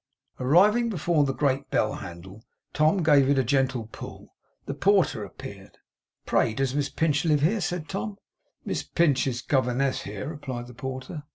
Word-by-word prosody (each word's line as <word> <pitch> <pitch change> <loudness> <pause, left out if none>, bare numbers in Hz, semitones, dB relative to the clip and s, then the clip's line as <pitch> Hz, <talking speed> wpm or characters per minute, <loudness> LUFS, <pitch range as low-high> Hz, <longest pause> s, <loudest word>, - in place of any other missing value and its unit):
Arriving 200 - +4
before 170 -5 +1
the 135 - 0
great 135 -1 0
bell - - +1
handle, 95 +5 -9 0.3
Tom 155 +5 +3
gave 145 -3 +5
it 140 - +3
a 135 - +3
gentle 130 -2 0
pull. - - -10 0.3
The - - -3
porter 195 +6 +2
appeared. - - -10 0.5
'Pray 110 - +1
does 135 -1 0
Miss 145 0 0
Pinch 150 -3 +1
live 150 -4 +2
here?' 200 +8 +2
said 175 -2 -3
Tom. 105 -6 -4 0.5
'Miss - - -2
Pinch 145 -6 +1
is 125 -1 -3
governess 130 0 +1
here,' 105 +3 -6
replied 135 -6 -6
the 125 - -12
porter. 130 +5 -6
140 Hz, 165 wpm, -26 LUFS, 125-160 Hz, 0.5 s, gave